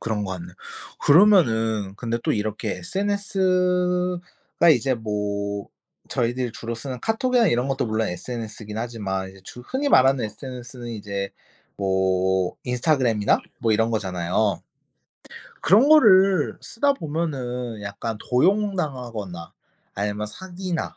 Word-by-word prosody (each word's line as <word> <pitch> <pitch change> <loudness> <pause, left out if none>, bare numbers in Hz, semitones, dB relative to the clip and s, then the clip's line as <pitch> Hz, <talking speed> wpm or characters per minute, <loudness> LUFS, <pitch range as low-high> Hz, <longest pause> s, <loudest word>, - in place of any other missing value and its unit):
그런 105 -2 -2
것 95 - -4
같네요. 90 -1 -8 0.5
그러면은 115 - +4
근데 115 0 -2
또 - - +2
이렇게 105 -1 -2
SNS가 180 - 0
이제 130 +2 0
뭐 100 -2 -3 0.4
저희들이 120 0 -1
주로 115 0 -5
쓰는 125 +1 -6
카톡이나 240 - +2
이런 125 +1 +1
것도 135 -1 -1
물론 110 0 0
SNS긴 110 +1 -6
하지만 100 -5 -3
이제 95 - -16
주 125 - -10
흔히 265 - -2
말하는 130 - +5
SNS는 120 +2 -8
이제 100 -3 -4 0.5
뭐 95 -1 +1
인스타그램이나 125 -4 +2 0.2
뭐 115 -3 +1
이런 115 +2 +2
거잖아요. 95 -1 0 1.0
그런 215 - +5
거를 195 - +6
쓰다 280 +5 +1
보면은 130 - -3
약간 100 +3 -4
도용당하거나 125 - 0 0.4
아니면 105 +1 -2
사기나 185 - -5
120 Hz, 285 characters per minute, -23 LUFS, -, 1.0 s, 거를